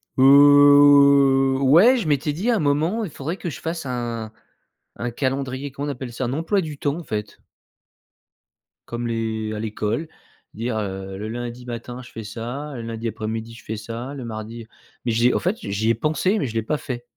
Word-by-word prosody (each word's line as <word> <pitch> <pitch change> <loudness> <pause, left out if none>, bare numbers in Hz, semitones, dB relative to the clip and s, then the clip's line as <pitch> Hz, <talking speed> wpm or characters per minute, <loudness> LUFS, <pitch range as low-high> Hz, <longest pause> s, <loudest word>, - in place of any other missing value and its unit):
Heu, 140 -1 +6
ouais 175 - +6
je 225 - -2
m'étais 145 0 +1
dit 195 +11 -2
à 235 - +4
un - - 0
moment: 155 +9 +1
«Il 180 - -5
faudrait 160 +7 -5
que 175 - -4
je - - -7
fasse 165 -2 -4
un 120 -3 -4 0.7
un 120 0 -2
calendrier, 135 +1 -2
comment 140 +2 -5
on - - 0
appelle 125 -2 -7
ça, - - -4
un 120 - -2
emploi 165 +7 0
du 155 -3 -6
temps, 145 +1 -1
en 175 - -7
fait». 105 -6 -5 1.5
Comme 120 0 -4
les 110 -2 -2
à 105 - -4
l'école, 110 +6 -2 0.5
dire, 115 +1 -3
heu, 95 -2 -4
le 105 +2 -5
lundi 120 +2 -6
matin 120 +1 -6
je 125 - -13
fais 115 - -8
ça, 120 +8 -6
le 120 - -6
lundi 115 0 -4
après-midi 110 +1 -5
je 115 - -13
fais 110 - -4
ça, 115 +5 -6
le 135 -3 -7
mardi 115 0 -7 0.4
mais 120 - 0
j'ai 120 +2 +3
en - - +1
fait, 185 +5 -1
j'y 100 +3 -1
ai - - +5
pensé 160 - 0
mais 140 - -1
je 110 - -7
l'ai 115 - 0
pas 150 +7 -1
fait. 125 -4 -6
125 Hz, 205 wpm, -22 LUFS, 115-145 Hz, 1.5 s, Heu